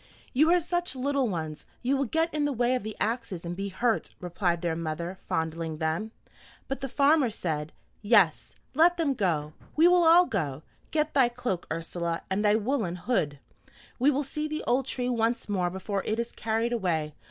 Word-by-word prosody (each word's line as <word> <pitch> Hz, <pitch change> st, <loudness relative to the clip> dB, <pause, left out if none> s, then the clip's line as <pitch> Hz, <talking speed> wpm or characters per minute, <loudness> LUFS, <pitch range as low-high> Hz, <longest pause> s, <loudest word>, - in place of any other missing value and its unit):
"You 305 Hz, +5 st, +4 dB
are 355 Hz, +1 st, +5 dB
such 350 Hz, -3 st, -2 dB
little 275 Hz, 0 st, 0 dB
ones, 155 Hz, -5 st, -5 dB, 0.2 s
you 265 Hz, +3 st, +2 dB
will 275 Hz, 0 st, +1 dB
get 325 Hz, +6 st, 0 dB
in 300 Hz, -1 st, +1 dB
the 290 Hz, -, +1 dB
way 245 Hz, -1 st, +1 dB
of 255 Hz, -, 0 dB
the 215 Hz, +1 st, -6 dB
axes 220 Hz, -7 st, -2 dB
and 170 Hz, +1 st, -4 dB
be 200 Hz, +2 st, -3 dB
hurt," 225 Hz, +4 st, -1 dB
replied 175 Hz, -1 st, -1 dB
their 170 Hz, -2 st, 0 dB
mother, 170 Hz, +3 st, -4 dB
fondling 160 Hz, 0 st, -2 dB
them. 160 Hz, +7 st, -1 dB, 0.6 s
But 270 Hz, 0 st, -4 dB
the 270 Hz, -, -3 dB
farmer 280 Hz, 0 st, +4 dB
said, 155 Hz, -7 st, -3 dB, 0.3 s
"Yes, 205 Hz, -7 st, +3 dB, 0.2 s
let 335 Hz, +5 st, +5 dB
them 310 Hz, -5 st, +1 dB
go; 160 Hz, -, -1 dB, 0.2 s
we 320 Hz, +3 st, +6 dB
will 355 Hz, 0 st, +5 dB
all 340 Hz, +2 st, +7 dB
go. 155 Hz, -, -3 dB, 0.3 s
Get 310 Hz, 0 st, 0 dB
thy 265 Hz, -4 st, +4 dB
cloak, 240 Hz, -7 st, -3 dB
Ursula, 165 Hz, +1 st, -3 dB
and 200 Hz, +2 st, +1 dB
thy 210 Hz, 0 st, +4 dB
woollen 220 Hz, -5 st, 0 dB
hood. 165 Hz, -, -1 dB, 0.6 s
We 265 Hz, +4 st, +5 dB
will 285 Hz, 0 st, +1 dB
see 300 Hz, +3 st, -3 dB
the 305 Hz, 0 st, -4 dB
old 255 Hz, +2 st, +1 dB
tree 250 Hz, -2 st, -1 dB
once 235 Hz, -1 st, 0 dB
more 185 Hz, -4 st, 0 dB
before 190 Hz, +2 st, -3 dB
it 215 Hz, -, -1 dB
is 235 Hz, 0 st, -2 dB
carried 225 Hz, +2 st, -1 dB
away. 165 Hz, -9 st, -1 dB
225 Hz, 190 wpm, -28 LUFS, 170-275 Hz, 0.6 s, all